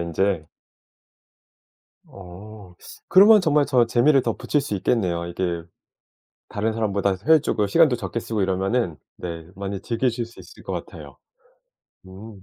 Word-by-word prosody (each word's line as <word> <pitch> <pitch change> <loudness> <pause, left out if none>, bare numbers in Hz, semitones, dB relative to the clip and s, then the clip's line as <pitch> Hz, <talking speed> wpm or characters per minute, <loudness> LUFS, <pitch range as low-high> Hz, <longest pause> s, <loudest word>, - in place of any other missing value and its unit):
인제. 85 0 -1 1.6
어 95 +1 -13 0.3
그러면 205 +3 +7
정말 150 -3 +2
저 125 -4 +3
재미를 135 +3 +3
더 115 - -1
붙일 145 - 0
수 105 - -4
있겠네요 90 -5 -1
이게. 85 -1 -3 0.9
다른 110 +2 -2
사람보다 100 -3 0
효율적으로 150 -9 +3
시간도 140 +3 +4
적게 115 - -4
쓰고 110 -2 -4
이러면은 95 -1 -1 0.2
네 85 -2 -7
많이 100 0 -5
즐기실 120 0 -2
수 115 - -19
있을 - - -14
것 - - -6
같아요. - - -8 0.9
음. 100 +1 -12
105 Hz, 280 characters per minute, -23 LUFS, 95-120 Hz, 1.6 s, 그러면